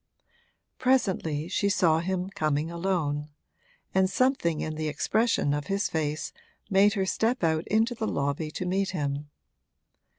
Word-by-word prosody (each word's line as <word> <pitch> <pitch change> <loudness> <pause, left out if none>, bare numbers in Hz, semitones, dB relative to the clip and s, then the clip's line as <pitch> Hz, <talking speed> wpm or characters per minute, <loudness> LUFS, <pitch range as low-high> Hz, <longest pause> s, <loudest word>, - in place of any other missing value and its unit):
Presently 190 - +1
she 200 +2 +1
saw 165 -5 +3
him 185 +2 -2
coming 155 -4 -1
alone, 165 -5 -1 0.6
and 190 0 +3
something 255 - +1
in 155 - -3
the 155 0 -3
expression 205 0 +1
of 145 -1 -3
his 200 +1 0
face 155 -1 -2 0.4
made 200 +1 +5
her 195 -3 0
step 225 +4 0
out 160 -1 +1
into 225 +3 +2
the 220 -2 -3
lobby 145 +1 -1
to 180 - -4
meet 190 +2 0
him. 145 0 -3
175 Hz, 140 wpm, -27 LUFS, 155-200 Hz, 0.6 s, made